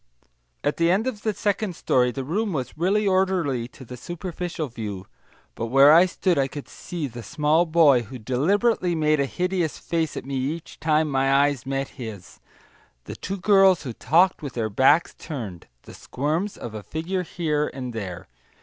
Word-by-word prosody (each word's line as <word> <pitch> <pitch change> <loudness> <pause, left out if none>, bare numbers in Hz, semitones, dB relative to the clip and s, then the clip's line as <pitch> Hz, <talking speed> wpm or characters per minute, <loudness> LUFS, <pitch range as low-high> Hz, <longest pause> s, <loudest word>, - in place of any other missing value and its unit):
At 145 - 0
the 165 0 +3
end 195 +6 +2
of 240 -5 -3
the 220 - 0
second 205 -2 -1
story, 125 -4 +2
the 135 +2 -4
room 195 - -1
was 130 -4 -4
really 200 +6 +1
orderly 185 -10 +1
to 130 +1 -14
the 125 - -8
superficial 175 +2 -5
view, 105 -6 -6 0.5
but 115 - -4
where 135 +5 +7
I 175 +3 +7
stood 180 -2 0
I 135 - +2
could 145 +1 -8
see 170 -4 -6
the 120 -3 -7
small 155 +5 +1
boy 155 -6 +5
who 125 +3 -9
deliberately 175 - +1
made 155 -1 +2
a 140 - +1
hideous 180 0 -1
face 165 -3 -2
at - - -6
me 135 0 -3
each 150 +6 -4
time 155 0 +2
my 135 -1 +1
eyes 140 -2 +2
met 135 0 -2
his, 105 -6 -8 0.6
the - - -8
two 195 +2 -5
girls 195 -2 +4
who 125 -5 -5
talked 175 +10 +3
with 140 -4 -6
their 110 -3 -2
backs 135 +9 +4
turned, 110 - -7 0.2
the - - -12
squirms 160 +9 -3
of 115 - -7
a 110 - -6
figure 165 - -3
here 155 -4 -1
and 125 -2 -6
there. 95 -6 -6
150 Hz, 185 wpm, -24 LUFS, 130-180 Hz, 0.6 s, where